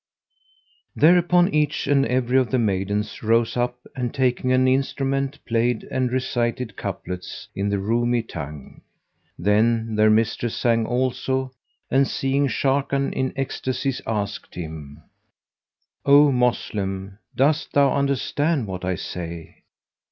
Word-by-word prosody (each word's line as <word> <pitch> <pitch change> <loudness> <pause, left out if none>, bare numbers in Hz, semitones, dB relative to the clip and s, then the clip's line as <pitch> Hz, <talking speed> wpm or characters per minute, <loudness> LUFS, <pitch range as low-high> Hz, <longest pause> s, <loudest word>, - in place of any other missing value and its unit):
Thereupon 175 +3 +4
each 150 -1 +1
and 140 -1 +3
every 125 +1 +2
of 125 -3 0
the 130 - +1
maidens 105 -1 -1
rose 115 +1 +2
up 125 0 -2
and 125 -2 -2
taking 130 -1 0
an 130 0 +4
instrument, 135 +1 0
played 115 0 0
and 130 -2 0
recited 120 -3 -1
couplets 90 0 -6
in 100 +1 -1
the 100 - 0
Roumi 115 +3 0
tongue; 75 -3 -8 0.6
then 110 +4 +2
their 110 0 +4
mistress 115 +1 +1
sang 115 -2 +1
also 130 +1 -1 0.4
and 135 +1 +4
seeing 140 +1 0
Sharrkan 135 +2 0
in 130 0 -1
ecstasies 135 -1 -2
asked 105 -2 -3
him, 80 -3 -8 1.0
"O 145 +1 +6
Moslem, 100 -6 -1 0.2
dost 150 +4 +1
thou 140 -2 +4
understand 140 +1 0
what 95 -2 -6
I 95 0 -1
say?" 85 -1 -7
125 Hz, 120 wpm, -23 LUFS, 105-135 Hz, 1.0 s, O